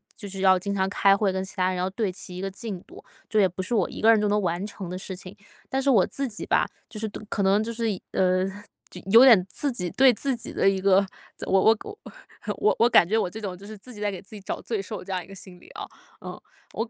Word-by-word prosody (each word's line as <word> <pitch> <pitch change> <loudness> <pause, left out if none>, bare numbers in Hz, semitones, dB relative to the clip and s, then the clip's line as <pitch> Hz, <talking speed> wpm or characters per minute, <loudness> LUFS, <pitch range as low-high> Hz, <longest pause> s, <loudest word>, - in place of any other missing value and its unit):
就 205 - -8
是 195 0 -6
要 190 -1 +5
经 200 +2 -3
常 190 -1 +1
开 195 0 +4
会 200 -2 +1
跟 190 0 -2
其 190 - -9
他 185 -2 +1
人 185 - -2
要 180 +1 -1
对 205 -1 -2
齐 180 0 -9
一 - - -5
个 195 - -3
进 200 -2 -6
度， - - -15 0.3
这 215 - +2
也 190 - +5
不 180 - -6
是 185 +6 -4
我 215 - +1
一 - - -9
个 225 - +5
人 225 - +4
就 210 - +1
能 210 +1 +2
完 175 +1 -2
成 200 -4 -7
的 180 - -5
事 190 0 -6
情。 185 +2 -10 0.3
但 270 0 -1
是 280 - +1
我 210 -8 +5
自 275 0 -3
己 215 -3 -6
吧， - - +2 0.2
就 215 - -7
是 220 - -2
对 - - -9
可 200 - -1
能 200 +3 +3
就 230 - -4
是， 230 0 -2 0.3
呃， 185 0 +2 0.4
就 180 - -8
有 230 +4 +9
点 215 -8 +7
自 290 - -1
己 180 -7 -3
对 260 -1 +5
自 265 +4 -1
己 235 - -7
的 195 - +3
一 195 -1 -1
个 195 +1 +4 0.3
怎 - - -7
我 190 - +5
我 225 +2 +5
我 420 0 -9 0.6
我 425 - +2
我 235 - +6
感 215 -7 +5
觉 220 +3 +1
我 180 - 0
这 220 +4 -9
种 185 -4 -5
就 200 - -13
是 215 - -9
自 245 +5 -13
己 210 - -11
在 205 - 0
给 190 - -7
自 195 - -18
己 - - -8
找 - - -5
罪 220 -4 -3
受 210 +2 -7
这 195 - -8
样 185 -1 -1
一 - - -17
个 195 - -12
心 180 -2 -13
理 - - -18
啊， - - -7 0.3
呃， - - -9 0.3
我 225 +1 -3
200 Hz, 315 characters per minute, -25 LUFS, 185-220 Hz, 0.6 s, 有